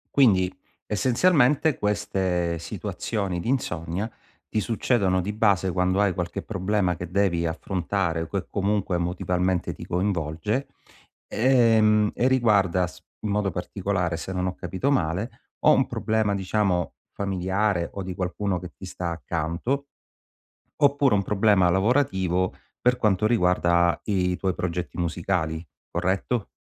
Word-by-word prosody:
Quindi 95 -9 +4 0.3
essenzialmente 135 - +3
queste 95 -5 0
situazioni 95 +2 -3
di 115 - -4
insonnia 90 -5 -2 0.4
ti 110 - -1
succedono 100 -3 +1
di 105 +3 -3
base 100 -4 +2
quando 90 +2 +1
hai 100 -3 +2
qualche 90 +1 -4
problema 95 -3 0
che 90 +1 -7
devi 90 -3 +1
affrontare 85 0 -2
o 80 - -4
che 100 +1 -3
comunque 100 -2 0
emotivamente 90 +1 -1
ti - - -10
coinvolge, 90 - -1 0.6
ehm, 110 -4 +4
e 125 - +1
riguarda 100 -8 +3
s 90 +1 -14 0.2
in 105 - -3
modo 100 -2 0
particolare, 90 -1 -2
se 95 +3 -5
non 90 0 -1
ho 90 - -3
capito 130 +10 -2
male, 110 - -1 0.2
o - - +5
un - - +4
problema 110 -2 0
diciamo 95 -2 0 0.2
familiare 95 -1 0
o 100 - -4
di 90 0 -5
qualcuno 95 0 -2
che 90 -5 -9
ti - - -15
sta 90 -1 -4
accanto 85 - -2 0.9
oppure 140 -4 +3
un 100 - +1
problema 100 -3 +3
lavorativo, 95 -4 +1 0.3
per 125 0 +3
quanto 105 -3 +2
riguarda 85 -5 +3
i 90 -3 0
tuoi 95 -1 -1
progetti 90 -1 -4
musicali. 85 -1 -1 0.2
Corretto? 100 +5 -1
95 Hz, 135 wpm, -25 LUFS, 90-105 Hz, 0.9 s, o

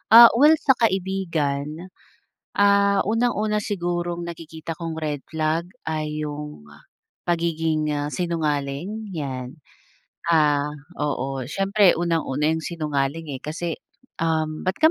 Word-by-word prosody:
Ah, 235 0 +11
well 300 +3 +7
sa - - +9
kaibigan, 180 -9 0 1.0
ah, 200 0 +4
unang-una 220 -2 +1
sigurong 175 -3 -2
nakikita 165 -1 -7
kong 165 -1 -4
red 145 -2 -2
flag 160 +1 0 0.2
ay 155 -1 -2
'yung 150 - -6 0.6
pagiging, 165 -2 0
ah, 145 0 -2
sinungaling, 165 +4 -2
yan. 130 -5 -4 0.8
Ah, 150 -3 +3 0.3
oo, 135 -2 -1
siyempre 195 +3 +3
unang-una 160 -3 0
yung 160 - -1
sinungaling, 150 -1 -2
eh, 130 - -5
kasi 160 +2 -4 0.4
um 160 0 -1
ba't 185 - +2
ka 315 - +8
160 Hz, 115 wpm, -23 LUFS, 150-180 Hz, 1.0 s, Ah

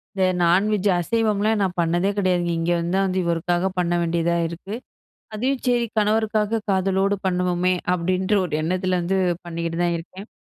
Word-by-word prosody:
இந்த 190 -1 +2 0.2
நான்வெஜ்ஜு, 200 +3 +3
அசைவம்லாம் 215 +1 +1
நான் 185 -1 -2
பண்ணதே 175 +4 +1
கிடையாதுங்க. 175 -3 +1
இங்க 165 +1 0
வந்து 170 +2 -1
தான் 195 - +2
வந்து 185 0 0
இவருக்காக 175 +2 0
பண்ண 175 -1 0
வேண்டியதா 170 0 0
இருக்கு. 170 +5 -8 0.6
"அதையும் 255 +4 -1
சரி 240 -1 +2
கணவருக்காக 215 +1 +1
காதலோடு 195 +1 +1
பண்ணுவோமே" 180 0 +1 0.2
அப்படின்ற 185 +3 0
ஒரு 165 - -7
எண்ணத்துல 185 +2 0
வந்து 190 +3 0 0.3
பண்ணிக்கிட்டு 170 0 -4
தான் 175 -1 +1
இருக்கேன். 190 +5 -11
185 Hz, 150 wpm, -22 LUFS, 175-205 Hz, 0.6 s, நான்வெஜ்ஜு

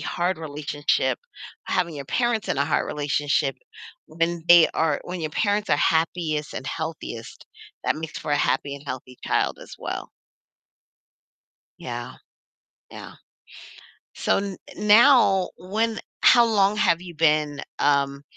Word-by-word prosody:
hard 175 0 -2
relationship 145 -2 -1 0.5
having 175 -3 0
your 140 -2 -6
parents 240 - -1
in - - -1
a 140 - +2
hard 145 0 0
relationship, 145 -1 0 0.5
when 165 +1 -2
they 175 -2 +8
are 160 -3 +1
when 180 0 -5
your 155 -1 -3
parents 205 +4 0
are - - +4
happiest 160 -1 0
and 130 - -6
healthiest, 160 -8 -6 0.4
that - - +1
makes 160 0 -6
for 150 - -3
a - - +3
happy 140 0 0
and 140 - -10
healthy 130 -2 -7
child - - 0
as - - -12
well. - - -5 1.7
Yeah. - - -6 0.8
Yeah. - - -10 1.0
So, - - +1
n 195 -1 -4 0.2
now 210 -3 +5
when 220 +5 -1 0.2
how 240 -2 +7
long 210 -2 +2
have 170 -5 +2
you 175 -2 -10
been, 150 -2 +1 0.2
um, 140 -1 +1
160 Hz, 135 wpm, -24 LUFS, 145-190 Hz, 1.7 s, they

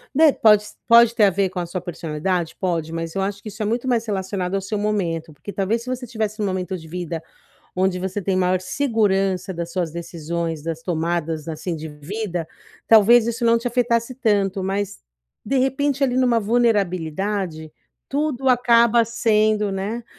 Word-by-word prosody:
Né, 310 +1 +6
pode 210 -5 +5
s - - -12
pode 235 0 +7
ter 230 -3 +3
a - - +5
ver 195 0 0
com 185 0 -5
a 175 - -2
sua 185 +2 -4
personalidade? 170 0 -3
Pode, 165 -4 -1
mas 165 0 -4
eu 195 - 0
acho 200 +1 -3
que 215 - -6
isso 215 +2 -9
é - - 0
muito 235 +4 -1
mais 240 -3 +2
relacionado 190 -2 -2
ao 195 - 0
seu 200 +3 -3
momento, 175 -6 -1
porque 200 +7 -9
talvez 215 +4 -1
se 250 - -7
você 255 0 -3
estivesse 215 -2 -3
num 210 - 0
momento 185 0 -2
de 160 -2 -12
vida 170 -1 -5 0.5
onde 185 0 +1
você 190 +2 -3
tem 190 0 -1
maior 185 0 +2
segurança 195 -4 0
das 170 0 -5
suas 175 -3 -1
decisões, 165 -1 -4
das 165 0 -4
tomadas, 165 -2 -2
assim, 165 +2 -4
de 160 0 -6
vida, 175 +4 -5 0.4
talvez 225 +1 +6
isso 235 +1 -2
não 230 0 +4
te 235 - -7
afetasse 240 0 0
tanto. 200 -6 +1
Mas, 200 +1 -2 0.4
de 270 +6 0
repente, 275 +1 +1
ali 250 -2 0
numa 250 -2 +3
vulnerabilidade, 195 -6 0 0.4
tudo 280 -2 -1
acaba 235 -2 +4
sendo, 215 -2 +1
né, 210 +5 -3
195 Hz, 185 wpm, -22 LUFS, 175-230 Hz, 0.5 s, pode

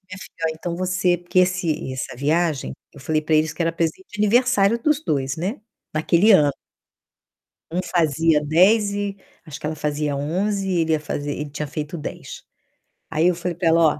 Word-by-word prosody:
minha 200 +2 -8
filha: 175 -3 -9
"Ó, - - 0
então 170 +2 -5
você" 185 0 +1
porque 175 +1 -1
esse 180 -7 0
essa 130 -1 -5
viagem, 155 +1 0 0.2
eu 145 - -14
falei 155 +3 0
para 155 +1 0
eles 155 0 +2
que 170 - -3
era 165 0 0
presente 165 +2 -2
de 210 - -10
aniversário 230 -1 +3
dos 300 +1 +2
2, 135 -2 -1
né, 190 - -3 0.3
naquele 170 +7 +4
ano. 150 -6 +5 1.2
Um 180 +2 0
fazia 160 -2 +2
10 195 +8 +4
e 200 -1 -3 0.3
acho 155 -2 -8
que - - -7
ela 155 - -3
fazia 150 -1 -2
11 195 +8 -1
e 185 -2 +1
ele 160 0 +1
ia 155 - +1
fazer 145 -1 -4
ele 150 +1 -5
tinha 150 +1 -4
feito 150 +3 -5
10. - - -8 0.7
Aí 160 +2 +2
eu 180 - +2
falei 175 0 -3
para 175 0 -1
ela: 165 +1 +4
"Ó, 155 - +2
165 Hz, 195 wpm, -22 LUFS, 150-185 Hz, 1.2 s, ano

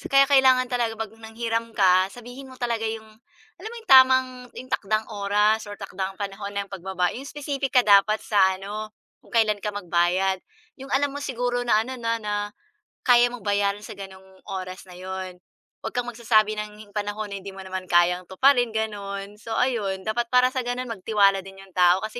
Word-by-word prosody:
Kaya 275 0 +4
kailangan 260 -2 +5
talaga 240 -3 0
'pag 225 -1 -5
nanghiram 225 0 -4
ka 185 -1 +4
sabihin 245 +3 -10
mo 260 - -12
talaga 235 -2 -2
yung, 220 0 -4 0.6
alam 420 - -6
mo - - -8
yung - - -12
tamang, 260 0 +7 0.3
yung 255 - -9
takdang 215 +2 0
oras 210 +2 +1
or 205 - -7
takdang 195 -1 -5
panahon 200 0 -5
ng 200 -1 -3
pagbaba 185 -2 -2
yung 265 +3 -8
specific 280 -2 -4
ka 250 - +7
dapat 205 +1 +5
sa 190 -3 +3
ano, 210 +3 -6 0.3
kung - - -18
kailan 215 -2 +3
ka 210 +1 -4
magbayad. 185 0 +1 0.4
Yung 270 - -8
alam 285 +1 +2
mo 285 - -5
siguro 245 -3 -2
na 215 -2 +4
ano 260 +1 -7
na 230 0 0
na, 210 0 -2 0.7
kaya 245 -1 +6
mong 245 -3 -9
bayaran 200 0 +1
sa - - -9
gano'ng 190 -1 -12
oras 185 0 -6
na 185 - -14
'yon, 185 -1 -6 0.4
'wag - - -5
kang 245 -1 0
magsasabi 225 -3 +2
ng 210 0 -8
panahon 205 0 -4
na 200 - -4
hindi 200 - -8
mo 195 - -8
naman 185 0 -5
kayang 180 +1 +3
tuparin 245 +3 +3
gano'n. 205 -2 -4
So 225 0 -6
ayun 205 -7 0
dapat 235 +4 -1
para 250 +1 +4
sa 260 - -2
gano'n 245 +1 -2
magtiwala 200 -2 +2
din 195 0 -11
yung 195 - -18
tao 180 +2 +4
kasi 215 +2 -5
215 Hz, 190 wpm, -24 LUFS, 195-245 Hz, 0.7 s, tamang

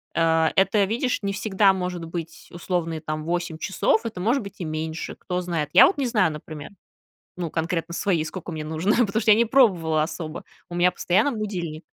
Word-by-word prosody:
э, 165 -1 +3
это, 195 +1 +3
видишь, 245 +5 -1
не 200 0 -2
всегда 195 -1 +3
может 180 -2 -4
быть 165 0 -7
условные 170 -2 -3
там 155 0 -4
8 175 -1 -2
часов, 220 +5 +1
это 215 -5 -5
может 235 +8 +1
быть 200 -1 -9
и 175 - -4
меньше, 160 +1 -4
кто 180 -1 -4
знает. 165 -4 -2
Я - - +9
вот 380 - +1
не 270 - 0
знаю, 210 -8 +2
например, 150 +1 -9 0.7
ну, 175 -2 -4
конкретно 170 +1 -2
свои, 175 -6 0
сколько 180 +2 -7
мне 155 -1 -5
нужно, 160 +7 0
потому 215 +3 -1
что 220 - +3
я 210 - +8
не 235 - +4
пробовала 180 - +3
особо, 155 0 -5 0.3
у 175 - -8
меня 175 +1 +4
постоянно 180 +9 +1
будильник 180 -8 -4
175 Hz, 195 wpm, -24 LUFS, 160-200 Hz, 0.7 s, Я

